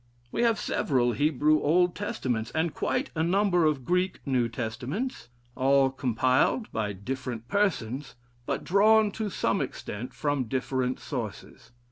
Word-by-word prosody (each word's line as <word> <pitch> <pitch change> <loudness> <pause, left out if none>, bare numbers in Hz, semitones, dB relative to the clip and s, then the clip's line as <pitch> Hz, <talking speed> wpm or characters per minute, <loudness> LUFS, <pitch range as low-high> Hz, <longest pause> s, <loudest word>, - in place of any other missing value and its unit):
We - - -1
have 230 -3 +3
several 125 -3 +1
Hebrew 150 +2 +2
Old 175 +3 +3
Testaments, 125 - -2
and 160 0 0
quite 255 +3 -1
a 160 - -1
number 180 0 +3
of 145 -5 0
Greek 180 +3 0
New 125 -4 +1
Testaments, 125 - -4 0.3
all 135 0 +3
compiled 130 - +1
by 105 -2 -1
different 120 +3 -5
persons, 145 - -1 0.3
but - - -2
drawn, 210 +2 +4
to 215 +1 -3
some - - 0
extent, 120 +5 -5
from 145 -3 0
different 130 +1 -1
sources. 120 -7 -6
140 Hz, 135 wpm, -27 LUFS, 125-180 Hz, 0.3 s, drawn